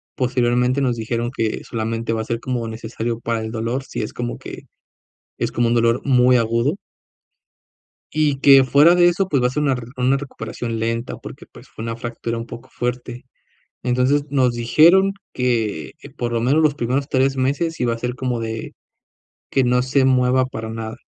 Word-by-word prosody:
Posteriormente 125 0 +1
nos 125 -3 0
dijeron 115 +2 -2
que 110 -1 -1
solamente 115 0 -3
va 110 - -1
a - - -5
ser 115 +1 -2
como 120 -3 -3
necesario 115 +1 -4
para 115 -1 -2
el 110 - -5
dolor, 115 +4 -2
si - - -5
es - - -6
como 120 0 -4
que - - -9 0.8
es - - -2
como 120 0 +1
un 120 - +1
dolor 115 +1 +2
muy 125 -2 +4
agudo. 115 +7 +1 1.4
Y 150 -3 +1
que 135 -1 +7
fuera 145 +6 +5
de 175 0 +5
eso, 180 +2 +1
pues 140 -8 +1
va 125 - +3
a - - -1
ser 150 +3 -1
una 135 -3 +2
rer 120 -1 -8
una 130 +2 +2
recuperación 115 -4 -5
lenta 115 +2 -2
porque, - - -11
pues, - - -15
fue - - -9
una 115 0 -3
fractura 115 0 -5
un 115 - -5
poco 120 0 -11
fuerte. 125 0 -4 0.6
Entonces 130 +3 +1
nos 130 -4 +2
dijeron 170 +11 +5 0.2
que 115 -9 -1
que - - -13
por 120 -1 -4
lo 115 - 0
menos 140 +7 +3
los 150 -2 +3
primeros 135 +2 -1
3 135 0 +1
meses 145 +6 -1
iba 120 -2 +1
a 115 - -7
ser 125 +1 -3
como 125 -3 -2
de 110 0 -5 0.8
que 135 - +2
no 125 0 +2
se 130 +1 +2
mueva 130 0 +3
para 110 -3 -6
nada. 110 0 -6
125 Hz, 195 wpm, -20 LUFS, 115-135 Hz, 1.4 s, que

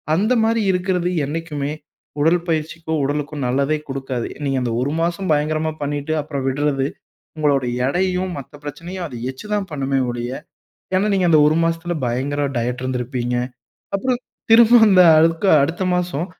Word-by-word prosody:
அந்த 215 +8 +2
மாரி 225 0 +2
இருக்கிறது 180 -1 0 0.2
என்னைக்குமே 150 -2 -3 0.5
உடல் 170 +3 +3
பயிற்சிக்கும், 160 0 -2
உடலுக்கும் 145 0 -2
நல்லதே 140 +4 +1
குடுக்காது. 135 -3 -4 0.2
நீங்க 135 -1 0
அந்த 120 -2 -1
1 140 +3 -1
மாசம் 175 +2 -1
பயங்கரமா 155 +1 +1
பண்ணீட்டு, 145 +2 -2
அப்பறம் 140 -3 -4
விடுறது 135 0 0 0.5
உங்களுடைய 140 -5 +1 0.2
எடையையும், 185 +3 0
மத்த 135 - -12
பிரச்சனையும், 175 +5 -6
அது 125 - -10 0.2
எச்சு 130 +10 -12
தான் 200 -2 -1
பண்ணுமே 135 -1 0
ஒழிய 120 +1 -4 0.6
ஏன்னா 195 +3 +2
நீங்க 185 -2 +2
அந்த 155 - +6
1 155 +1 +3
மாசத்துல 165 +1 -1
பயங்கர 140 +4 -1
டயட் 125 +2 -2
இருந்திருப்பீங்க. 125 -1 -2 0.6
அப்பறம் 250 +4 0 0.3
திரும்பவும் 230 0 +7
அந்த 185 -2 +7 0.2
அதுக்கு 165 +4 +3
அடுத்த 170 +6 -1
மாசம், 175 -2 -1
155 Hz, 145 wpm, -20 LUFS, 135-180 Hz, 0.6 s, திரும்பவும்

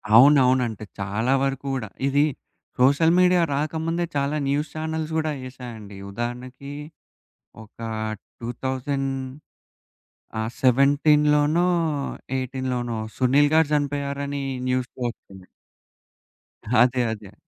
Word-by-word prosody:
అవునవునంటే, 125 -4 +5
చాలా 105 +6 0
వరకు 135 0 -2
గూడా. 120 -6 -3 0.2
ఇది, 140 +1 +3 0.6
సోషల్ 145 +6 +5
మీడియా 180 -1 +5
రాకముందే 160 +4 -1
చాలా 140 +1 0
న్యూస్ 145 +2 0
ఛానెల్స్ 160 0 -3
గూడా 155 -1 0 0.2
ఏశాయండి. 115 -6 -9
ఉదాహరణకి 125 +5 -6 0.9
ఒక 105 - -21 0.6
2000 130 +3 -2 1.3
ఆహ్, 110 0 -1
17, 150 +5 +4 0.7
18 130 -2 -2 0.2
'సునీల్' 140 +3 +4
గారు 160 -1 +5
చనిపోయారని 140 -1 -2 0.2
న్యూస్‌లో 125 0 -2
ఒచ్చింది. 95 -5 -16 1.3
అదే. 125 +1 +3
అదే. 105 -2 -8
135 Hz, 90 wpm, -24 LUFS, 125-145 Hz, 1.3 s, అవునవునంటే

